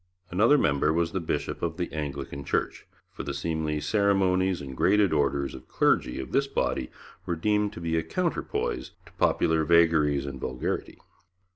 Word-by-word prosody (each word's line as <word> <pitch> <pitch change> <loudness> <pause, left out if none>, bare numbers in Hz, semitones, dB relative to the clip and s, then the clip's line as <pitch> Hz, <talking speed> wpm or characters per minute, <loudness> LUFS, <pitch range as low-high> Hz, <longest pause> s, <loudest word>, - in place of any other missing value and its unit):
Another 110 +11 +5
member 75 - +2
was 85 +1 0
the 95 - -1
bishop 85 - -3
of 85 -1 -2
the 85 -5 -3
Anglican 70 -2 -5
Church, - - -2 0.2
for - - -7
the 70 0 -4
seemly 75 0 -2
ceremonies 95 -1 +2
and 65 -2 -7
graded 100 +4 +3
orders 70 -2 0
of - - -11
clergy 60 - +1
of 65 -1 -6
this 140 0 +2
body 65 - -1 0.4
were 85 - 0
deemed 105 +4 +1
to 85 - -8
be 80 -1 -1
a 80 - +2
counterpoise - - -2
to - - -17
popular 80 0 +2
vagaries 80 -4 +3
and 70 -1 -6
vulgarity. 65 -1 -3
80 Hz, 165 wpm, -27 LUFS, 70-95 Hz, 0.4 s, Another